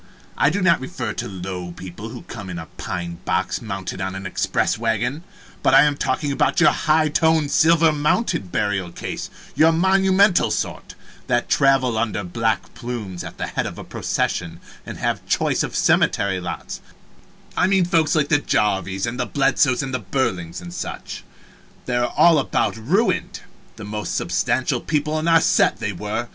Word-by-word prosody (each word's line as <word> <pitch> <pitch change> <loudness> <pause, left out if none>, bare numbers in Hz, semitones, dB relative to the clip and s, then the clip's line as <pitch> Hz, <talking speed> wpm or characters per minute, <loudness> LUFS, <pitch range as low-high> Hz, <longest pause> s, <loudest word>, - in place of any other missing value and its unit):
I 145 - +3
do 190 +4 -1
not 170 -2 +4
refer 130 -4 -4
to - - -4
low 90 -2 -6
people 95 +5 -8
who 120 0 -9
come 100 -5 -8
in 90 - -5
a 80 - -6
pine 85 -1 -5
box 95 0 -1
mounted 95 -3 -5
on 95 0 -3
an 95 0 -6
express - - 0
wagon, 120 +7 -1 0.4
but - - +4
I - - +8
am 145 -1 +2
talking 140 +1 -1
about 140 - +1
your 170 - +6
high 155 -2 +2
toned, 160 -1 +2
silver 165 0 +5
mounted 150 - 0
burial 95 -4 -1
case, - - -6 0.2
your 160 +1 +5
monumental 190 +2 +3
sort, - - -4 0.3
that 120 -1 0
travel 135 -5 +3
under 110 -2 -1
black 110 +4 -2
plumes 115 -7 -6
at 85 - -9
the - - -2
head - - -2
of - - -8
a - - -7
procession 85 -1 -2 0.3
and - - -6
have - - -2
choice - - +1
of - - -3
cemetery 95 -2 +2
lots 90 - -6 0.7
I 180 - +3
mean 190 -2 +3
folks 165 -3 +2
like 150 -2 +1
the 145 -3 +4
Jarvises, 95 -7 0
and 125 +2 -4
the 125 - -1
Bledsoes 135 -1 +2
and 130 -1 -5 0.2
Burlings, 90 -10 -2
and 85 -1 -9
such. - - -6 0.6
They 125 - -2
are 120 0 0
all 165 -3 +6
about 135 - 0
ruined. 170 - 0 0.3
The 110 - -9
most 105 -2 -4
substantial - - 0
people 155 +1 -1
in 160 - -2
our 165 -1 +5
set, - - +3
they - - -3
were. - - -4
120 Hz, 175 wpm, -21 LUFS, 95-155 Hz, 0.7 s, I